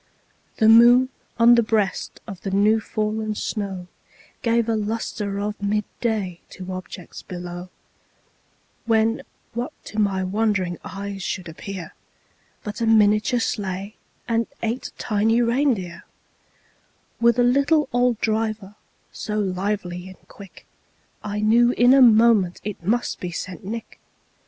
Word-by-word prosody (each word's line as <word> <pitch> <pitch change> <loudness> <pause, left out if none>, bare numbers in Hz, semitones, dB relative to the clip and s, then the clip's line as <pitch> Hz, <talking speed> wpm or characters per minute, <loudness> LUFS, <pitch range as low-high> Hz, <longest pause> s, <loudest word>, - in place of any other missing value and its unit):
The 220 - +4
moon 240 +3 +7 0.3
on 235 +1 +7
the 235 - +5
breast 215 -4 -1
of 195 -5 -9
the 195 - -4
new 205 +3 +3
fallen 215 0 -2
snow 195 -4 -4 0.6
Gave 235 -1 +1
a 225 - +1
luster 210 -1 -3
of 210 +1 -4
mid 210 +1 0 0.2
day 205 -7 -2
to 185 0 -7
objects 185 -1 -8
below, 175 0 -7 1.2
When, 225 0 +2 0.3
what 240 +2 -4
to 215 - -5
my 195 -2 +1
wondering 190 -3 0
eyes 200 0 -6
should 180 0 -4
appear, 180 +2 -8 0.7
But 210 +2 -6
a 230 - +1
miniature 215 +2 +4
sleigh, 200 -1 -3 0.3
and 230 -1 0 0.2
eight 235 +3 -2
tiny 225 +1 +1
reindeer, 235 -8 0 1.2
With 235 0 +4
a 245 - +4
little 280 +5 +3
old 245 -2 +2
driver, 215 -2 -1 0.4
so 210 0 -4
lively 190 -2 -2
and 190 - -16
quick, 200 -2 -14 0.6
I 210 0 -3
knew 235 +3 +4
in 245 +2 +5
a 275 - +6
moment 220 -6 +5
it 210 -3 -5
must 235 +7 0
be 180 - -4
St. 185 +4 -6
Nick. 225 +4 -7
215 Hz, 130 wpm, -23 LUFS, 195-230 Hz, 1.2 s, moon